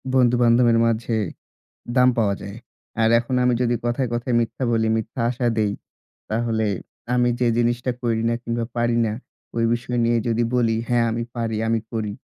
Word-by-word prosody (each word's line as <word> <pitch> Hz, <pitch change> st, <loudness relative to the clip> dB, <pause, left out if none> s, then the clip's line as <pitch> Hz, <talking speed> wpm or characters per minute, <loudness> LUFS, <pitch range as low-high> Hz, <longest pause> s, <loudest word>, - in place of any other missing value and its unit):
বন্ধুবান্ধবের 120 Hz, -1 st, +4 dB
মাঝে 115 Hz, 0 st, 0 dB, 0.8 s
দাম 125 Hz, 0 st, +6 dB
পাওয়া 100 Hz, -3 st, +2 dB
যায়। 100 Hz, +3 st, -8 dB, 0.4 s
আর 110 Hz, -, +4 dB
এখন 120 Hz, +2 st, -3 dB
আমি 125 Hz, 0 st, +3 dB
যদি 120 Hz, 0 st, +1 dB
কথায়, 120 Hz, +2 st, 0 dB
কথায় 120 Hz, +1 st, -1 dB
মিথ্যা 115 Hz, +3 st, -2 dB
বলি, 110 Hz, -1 st, +2 dB
মিথ্যা 115 Hz, +3 st, -4 dB
আশা 125 Hz, 0 st, -2 dB
দেই 105 Hz, -2 st, +1 dB, 0.6 s
তাহলে 110 Hz, -1 st, 0 dB, 0.5 s
আমি 125 Hz, 0 st, +3 dB
যে 125 Hz, -, +3 dB
জিনিসটা 120 Hz, +1 st, +1 dB
করি 115 Hz, -2 st, 0 dB
না 115 Hz, -, +1 dB
কিংবা 115 Hz, 0 st, -2 dB
পারি 120 Hz, 0 st, +1 dB
না, 105 Hz, -, -1 dB, 0.4 s
ঐ -, -, -9 dB, 0.2 s
বিষয় 120 Hz, +1 st, -3 dB
নিয়ে 115 Hz, 0 st, +2 dB
যদি 115 Hz, +1 st, +1 dB
বলি 115 Hz, -2 st, +2 dB
হ্যাঁ 120 Hz, -1 st, +3 dB
আমি 115 Hz, +1 st, -2 dB
পারি, 115 Hz, -2 st, -2 dB
আমি 115 Hz, -1 st, +1 dB
করি, 110 Hz, -2 st, -2 dB
115 Hz, 170 wpm, -22 LUFS, 115-120 Hz, 0.8 s, দাম